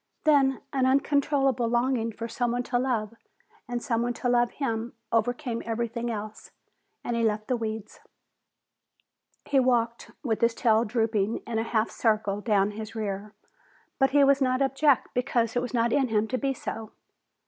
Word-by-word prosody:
Then 275 Hz, -3 st, +3 dB
an 260 Hz, -1 st, +2 dB
uncontrollable 275 Hz, -2 st, +2 dB
longing 240 Hz, -1 st, +1 dB
for 230 Hz, +1 st, -6 dB
someone 240 Hz, +1 st, -1 dB
to 245 Hz, 0 st, 0 dB
love 230 Hz, -4 st, -1 dB, 0.5 s
and 240 Hz, -1 st, -3 dB
someone 240 Hz, +1 st, 0 dB
to 245 Hz, -, -1 dB
love 240 Hz, -1 st, +3 dB
him 235 Hz, -4 st, -3 dB, 0.2 s
overcame 240 Hz, +2 st, 0 dB
everything 235 Hz, +1 st, -3 dB
else 215 Hz, -1 st, -6 dB, 0.5 s
and 240 Hz, -, -2 dB
he 230 Hz, -, 0 dB
left 215 Hz, -1 st, 0 dB
the 255 Hz, -, +1 dB
weeds. 220 Hz, -2 st, -5 dB, 1.5 s
He 275 Hz, -, +3 dB
walked 235 Hz, -2 st, +1 dB
with 225 Hz, -5 st, -1 dB
his 230 Hz, 0 st, +3 dB
tail 225 Hz, -1 st, +3 dB
drooping 220 Hz, -1 st, 0 dB
in 225 Hz, -1 st, -2 dB
a -, -, 0 dB
half 225 Hz, -1 st, 0 dB
circle 215 Hz, -3 st, 0 dB
down 205 Hz, -2 st, +2 dB
his 215 Hz, +1 st, -8 dB
rear, 210 Hz, -1 st, -4 dB, 0.6 s
but 270 Hz, -1 st, +4 dB
he 285 Hz, +1 st, +4 dB
was 275 Hz, 0 st, +4 dB
not 255 Hz, -1 st, +2 dB
abject 275 Hz, 0 st, +2 dB
because 240 Hz, -2 st, 0 dB
it 245 Hz, -, +2 dB
was 250 Hz, -, -4 dB
not 235 Hz, -2 st, +1 dB
in 270 Hz, -2 st, +3 dB
him 220 Hz, -1 st, +1 dB
to 255 Hz, -, 0 dB
be 270 Hz, -1 st, -1 dB
so. 225 Hz, -2 st, -6 dB
235 Hz, 165 wpm, -27 LUFS, 220-255 Hz, 1.5 s, but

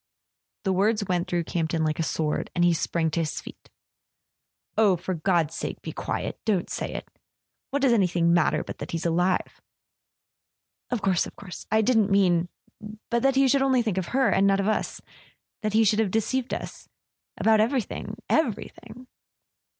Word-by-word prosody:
The 190 Hz, -2 st, +1 dB
words 205 Hz, +3 st, +1 dB
went 180 Hz, 0 st, 0 dB
through 175 Hz, -1 st, 0 dB
Campton 165 Hz, -1 st, -1 dB
like 155 Hz, 0 st, -1 dB
a -, -, +2 dB
sword, 155 Hz, -1 st, -1 dB
and 175 Hz, -, +3 dB
he 175 Hz, -, +4 dB
sprang 165 Hz, 0 st, -1 dB
to 170 Hz, -, -1 dB
his 160 Hz, -2 st, -2 dB
feet. -, -, -12 dB, 1.1 s
"Oh, 210 Hz, -4 st, +4 dB
for 185 Hz, +2 st, -4 dB
God's 165 Hz, -2 st, +1 dB
sake -, -, -4 dB
be -, -, -5 dB
quiet -, -, -4 dB
—don't 200 Hz, -6 st, 0 dB
say -, -, -3 dB
it! -, -, -6 dB, 0.6 s
What 280 Hz, 0 st, -1 dB
does 260 Hz, -3 st, +5 dB
anything 175 Hz, -5 st, +2 dB
matter 175 Hz, -2 st, +2 dB
but -, -, -8 dB
that 145 Hz, -, -6 dB
he's 165 Hz, 0 st, -3 dB
alive?" 175 Hz, +2 st, 0 dB, 1.3 s
"Of 245 Hz, -5 st, -2 dB
course, 190 Hz, -3 st, +2 dB
of -, -, -13 dB
course... 185 Hz, -3 st, -10 dB
I 220 Hz, -, +3 dB
didn't 220 Hz, -3 st, +3 dB
mean... 180 Hz, -3 st, +3 dB, 0.6 s
But 235 Hz, 0 st, +2 dB
that 270 Hz, +1 st, +3 dB
he 270 Hz, 0 st, +4 dB
should 275 Hz, +2 st, +3 dB
think 260 Hz, -3 st, +2 dB
only 215 Hz, -, +1 dB
of 190 Hz, -2 st, -2 dB
her, 265 Hz, +1 st, +2 dB
and 195 Hz, +1 st, +3 dB
not 195 Hz, 0 st, +3 dB
of 200 Hz, -, 0 dB
us... 215 Hz, -, -1 dB, 0.6 s
that 215 Hz, -1 st, -2 dB
he 220 Hz, +1 st, +5 dB
should 210 Hz, 0 st, +3 dB
have 220 Hz, -3 st, +2 dB
deceived 230 Hz, +5 st, -1 dB
us... -, -, -6 dB, 0.5 s
about 220 Hz, -1 st, +4 dB
everything... 230 Hz, 0 st, -1 dB
everything. 250 Hz, -2 st, -2 dB
195 Hz, 180 wpm, -26 LUFS, 175-225 Hz, 1.3 s, does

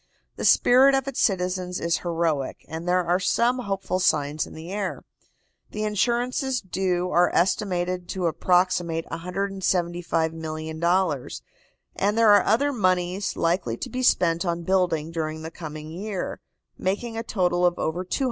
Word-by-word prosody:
The -, -, -4 dB
spirit 265 Hz, +3 st, +6 dB
of 270 Hz, 0 st, -1 dB
its 275 Hz, -, -2 dB
citizens 180 Hz, -2 st, 0 dB
is 170 Hz, 0 st, 0 dB
heroic, 165 Hz, -5 st, -2 dB
and 165 Hz, +2 st, -5 dB
there 180 Hz, 0 st, +3 dB
are 175 Hz, +2 st, +2 dB
some 240 Hz, +6 st, +1 dB
hopeful 195 Hz, -4 st, -2 dB
signs 150 Hz, -4 st, +1 dB
in -, -, -12 dB
the 165 Hz, +3 st, -8 dB
air. 200 Hz, -2 st, -3 dB, 0.7 s
The 215 Hz, -, -4 dB
insurances 245 Hz, +5 st, 0 dB
due 180 Hz, -2 st, -1 dB
are 175 Hz, +1 st, +4 dB
estimated 180 Hz, -1 st, 0 dB
to 185 Hz, -2 st, -2 dB
approximate 175 Hz, -1 st, +1 dB
$175,000,000, 170 Hz, -3 st, -1 dB, 0.5 s
and 205 Hz, +2 st, 0 dB
there 225 Hz, -2 st, +6 dB
are 205 Hz, -, +6 dB
other 280 Hz, +7 st, +2 dB
moneys 185 Hz, -2 st, 0 dB
likely 165 Hz, -9 st, 0 dB
to -, -, -5 dB
be 255 Hz, -, -3 dB
spent 170 Hz, -8 st, +3 dB
on 170 Hz, -1 st, -2 dB
building 170 Hz, -4 st, +1 dB
during 160 Hz, -1 st, -4 dB
the 160 Hz, -, -6 dB
coming 155 Hz, -2 st, -8 dB
year, 195 Hz, +2 st, -4 dB, 0.4 s
making 215 Hz, +5 st, -2 dB
a 225 Hz, -, -2 dB
total 180 Hz, -5 st, 0 dB
of 175 Hz, -1 st, +3 dB
over 170 Hz, +3 st, -2 dB
$200,000,000. 185 Hz, -, -3 dB
180 Hz, 145 wpm, -25 LUFS, 165-200 Hz, 0.7 s, spirit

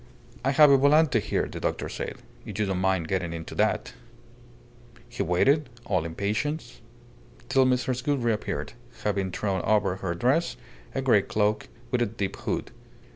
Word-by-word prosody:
"I 135 Hz, -, +2 dB
have 145 Hz, +1 st, +7 dB
a 140 Hz, -, +7 dB
volante 145 Hz, -2 st, +4 dB
here," -, -, -1 dB
the -, -, -7 dB
doctor -, -, -2 dB
said. -, -, -5 dB, 0.3 s
"If 105 Hz, -, -7 dB
you 105 Hz, -, +1 dB
don't 95 Hz, -2 st, -1 dB
mind 95 Hz, -3 st, +1 dB
getting 90 Hz, -3 st, -1 dB
into 80 Hz, -1 st, -7 dB
that -, -, 0 dB, 0.6 s
" 120 Hz, 0 st, -25 dB
He 120 Hz, -3 st, -5 dB
waited, 135 Hz, -, +2 dB, 0.2 s
all 95 Hz, -5 st, 0 dB
impatience, 105 Hz, -, -3 dB, 0.7 s
till 135 Hz, -1 st, +4 dB
Mrs. 125 Hz, -1 st, 0 dB
Gould 140 Hz, -3 st, 0 dB
reappeared, 110 Hz, -1 st, -2 dB, 0.3 s
having 100 Hz, -2 st, 0 dB
thrown 95 Hz, 0 st, -1 dB
over 105 Hz, -4 st, +2 dB
her 90 Hz, -2 st, -3 dB
dress 130 Hz, -, +1 dB, 0.4 s
a -, -, -1 dB
grey -, -, +5 dB
cloak 105 Hz, 0 st, 0 dB, 0.2 s
with 125 Hz, -, +1 dB
a 120 Hz, -, +2 dB
deep 100 Hz, -2 st, -3 dB
hood. -, -, -3 dB
110 Hz, 165 wpm, -26 LUFS, 95-130 Hz, 0.7 s, have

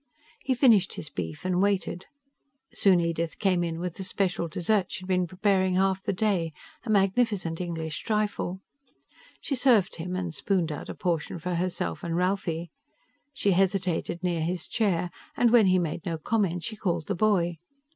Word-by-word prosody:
He 260 Hz, -, +1 dB
finished 225 Hz, -7 st, +4 dB
his 155 Hz, -, -7 dB
beef 80 Hz, -, -5 dB
and 185 Hz, 0 st, +1 dB
waited. 195 Hz, -2 st, 0 dB, 0.7 s
Soon 190 Hz, -3 st, +4 dB
Edith 170 Hz, -1 st, -1 dB
came 185 Hz, -3 st, +2 dB
in 165 Hz, -1 st, -3 dB
with 180 Hz, -1 st, -4 dB
the 195 Hz, -, -5 dB
special 185 Hz, -2 st, -1 dB
dessert 185 Hz, +4 st, 0 dB
she'd 185 Hz, -, -6 dB
been 180 Hz, -1 st, +1 dB
preparing 185 Hz, 0 st, +1 dB
half 190 Hz, 0 st, +2 dB
the -, -, -1 dB
day 185 Hz, -5 st, 0 dB, 0.3 s
a 235 Hz, -, -8 dB
magnificent 195 Hz, -4 st, +1 dB
English 160 Hz, -3 st, -3 dB
trifle. 210 Hz, -4 st, -1 dB, 0.8 s
She 290 Hz, -, -3 dB
served 245 Hz, -7 st, +3 dB
him, 180 Hz, +2 st, -4 dB
and 180 Hz, -3 st, -3 dB
spooned 175 Hz, 0 st, 0 dB
out 150 Hz, -, -6 dB
a -, -, -5 dB
portion 170 Hz, -2 st, -2 dB
for 180 Hz, +2 st, -3 dB
herself 170 Hz, -, -2 dB
and 165 Hz, -1 st, -2 dB
Ralphie. 175 Hz, -3 st, -1 dB, 0.6 s
She 235 Hz, -8 st, +1 dB
hesitated 185 Hz, -2 st, 0 dB
near 175 Hz, -3 st, 0 dB
his 175 Hz, +1 st, -2 dB
chair, 180 Hz, -6 st, 0 dB, 0.3 s
and 240 Hz, -2 st, +4 dB
when 230 Hz, -4 st, +6 dB
he 185 Hz, 0 st, +4 dB
made 170 Hz, -2 st, -2 dB
no 165 Hz, -2 st, -2 dB
comment 180 Hz, -1 st, 0 dB
she 225 Hz, -, -4 dB
called 175 Hz, -6 st, -1 dB
the 205 Hz, -, -1 dB
boy. 175 Hz, -4 st, +1 dB
180 Hz, 170 wpm, -27 LUFS, 170-200 Hz, 0.8 s, when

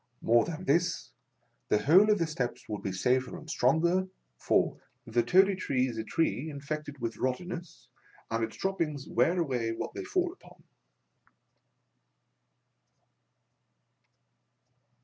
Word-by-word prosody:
More 115 Hz, +1 st, +4 dB
than 170 Hz, +2 st, -6 dB
this, 175 Hz, +4 st, +1 dB, 0.6 s
the 105 Hz, -, +2 dB
whole 185 Hz, +9 st, +6 dB
of 210 Hz, -, +4 dB
the 170 Hz, -, +1 dB
steps 135 Hz, -6 st, -4 dB
would 105 Hz, -1 st, -4 dB
be 95 Hz, -, -3 dB
safer 125 Hz, +7 st, 0 dB
and -, -, -12 dB
stronger; 170 Hz, +8 st, +2 dB, 0.3 s
for, -, -, +1 dB, 0.3 s
the 115 Hz, +1 st, +1 dB
Toady 190 Hz, +11 st, +4 dB
Tree 135 Hz, -8 st, 0 dB
is 115 Hz, -3 st, -5 dB
a -, -, -2 dB
tree 160 Hz, +3 st, -1 dB
infected 145 Hz, 0 st, -5 dB
with 115 Hz, -3 st, -4 dB
rot 130 Hz, -1 st, 0 dB
tenness, 175 Hz, -1 st, -8 dB, 0.5 s
and 115 Hz, 0 st, 0 dB
its 110 Hz, -, -4 dB
droppings 160 Hz, -7 st, -2 dB
wear 175 Hz, +3 st, +2 dB
away 125 Hz, -8 st, -1 dB
what -, -, -5 dB
they -, -, -5 dB
fall 365 Hz, -3 st, 0 dB
upon. -, -, -19 dB
150 Hz, 130 wpm, -30 LUFS, 120-180 Hz, 0.6 s, whole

